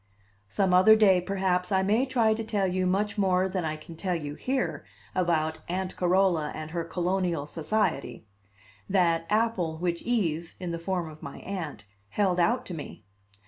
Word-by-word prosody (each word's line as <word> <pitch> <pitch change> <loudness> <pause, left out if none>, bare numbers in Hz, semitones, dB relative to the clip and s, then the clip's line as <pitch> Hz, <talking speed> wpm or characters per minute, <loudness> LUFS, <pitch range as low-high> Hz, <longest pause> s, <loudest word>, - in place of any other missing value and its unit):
Some 190 - +1
other 185 +4 +7
day, 195 -4 +5
perhaps, 180 -1 0
I 190 -1 +3
may 220 +7 +2
try 235 -4 +3
to 225 +1 -3
tell 210 -3 0
you 185 0 0
much 205 +3 0
more 185 -1 +3
than 185 -1 -2
I 155 -1 -2
can 165 +2 -11
tell 180 +2 -1
you 145 -3 -4
here 175 - -2 0.3
about 160 -3 0
Aunt 185 +1 -2
Carola 180 -4 +2
and 155 0 -6
her 170 0 -2
Colonial 175 -2 -1
Society 150 - -1 0.6
that 170 -4 +2
apple 210 -7 +1
which 170 0 -2
Eve, 170 -9 -1
in 180 -2 -4
the 170 - -3
form 180 -1 -2
of 155 -1 -12
my 140 - -8
Aunt, 165 - -5 0.3
held 185 - +1
out 230 +9 +2
to 180 - -6
me. 155 -3 -8
180 Hz, 175 wpm, -27 LUFS, 165-195 Hz, 0.6 s, other